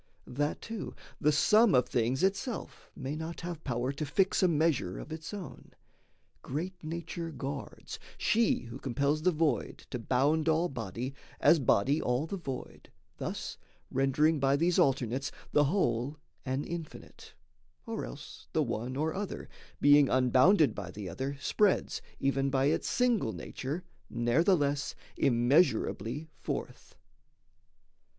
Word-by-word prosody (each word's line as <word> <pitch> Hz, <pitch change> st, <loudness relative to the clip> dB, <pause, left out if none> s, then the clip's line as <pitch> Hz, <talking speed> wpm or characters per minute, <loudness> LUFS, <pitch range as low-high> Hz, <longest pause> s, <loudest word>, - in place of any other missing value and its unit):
That, 145 Hz, +4 st, -2 dB
too, 225 Hz, -2 st, -6 dB, 0.2 s
the 150 Hz, -, +4 dB
sum 210 Hz, -, +5 dB
of 125 Hz, -, +4 dB
things 125 Hz, +4 st, 0 dB
itself 200 Hz, +5 st, -2 dB
may 135 Hz, +3 st, -4 dB
not 160 Hz, +2 st, -5 dB
Have 170 Hz, -2 st, -6 dB
power 125 Hz, 0 st, -1 dB
to 140 Hz, +2 st, -4 dB
fix 155 Hz, +7 st, +2 dB
a 185 Hz, -, +5 dB
measure 155 Hz, -, +1 dB
of -, -, -8 dB
its 160 Hz, 0 st, -6 dB
own, 200 Hz, -5 st, -9 dB, 0.7 s
Great 175 Hz, +7 st, -5 dB
nature 165 Hz, +1 st, -4 dB
guards, 140 Hz, -2 st, -6 dB, 0.2 s
she 230 Hz, 0 st, +2 dB
who 120 Hz, +2 st, -9 dB
compels 140 Hz, +4 st, 0 dB
the 180 Hz, -, +4 dB
void 160 Hz, -2 st, -1 dB
To 125 Hz, -, -3 dB
bound 145 Hz, +7 st, +2 dB
all 165 Hz, +3 st, +2 dB
body, 120 Hz, -, -5 dB, 0.3 s
as 165 Hz, -, +6 dB
body 130 Hz, +3 st, +3 dB
all 125 Hz, +4 st, 0 dB
the 180 Hz, -, -4 dB
void, 135 Hz, -8 st, -7 dB, 0.3 s
Thus -, -, -5 dB, 0.3 s
rendering 140 Hz, +4 st, +2 dB
by 135 Hz, 0 st, +3 dB
these 170 Hz, +4 st, +2 dB
alternates 135 Hz, +1 st, +1 dB, 0.2 s
the 150 Hz, 0 st, +4 dB
whole 140 Hz, -, 0 dB, 0.3 s
An 130 Hz, +2 st, -1 dB
infinite; 165 Hz, -3 st, -8 dB, 0.5 s
or -, -, -4 dB
else -, -, -9 dB
the -, -, +3 dB
one 120 Hz, +4 st, -3 dB
or 155 Hz, +3 st, 0 dB
other, 200 Hz, 0 st, -5 dB, 0.3 s
Being 145 Hz, -1 st, +6 dB
unbounded 130 Hz, -, +5 dB
by 95 Hz, -4 st, -6 dB
the 100 Hz, 0 st, -6 dB
other, 135 Hz, +8 st, -4 dB
spreads, 205 Hz, +6 st, +1 dB, 0.2 s
Even 135 Hz, 0 st, +1 dB
by 135 Hz, 0 st, +2 dB
its 145 Hz, -, +1 dB
single 235 Hz, -, +2 dB
nature, 145 Hz, +7 st, -5 dB, 0.3 s
ne'ertheless 145 Hz, +4 st, +2 dB, 0.2 s
Immeasurably 130 Hz, -, +2 dB
forth.... -, -, -5 dB
145 Hz, 135 wpm, -31 LUFS, 130-165 Hz, 0.7 s, as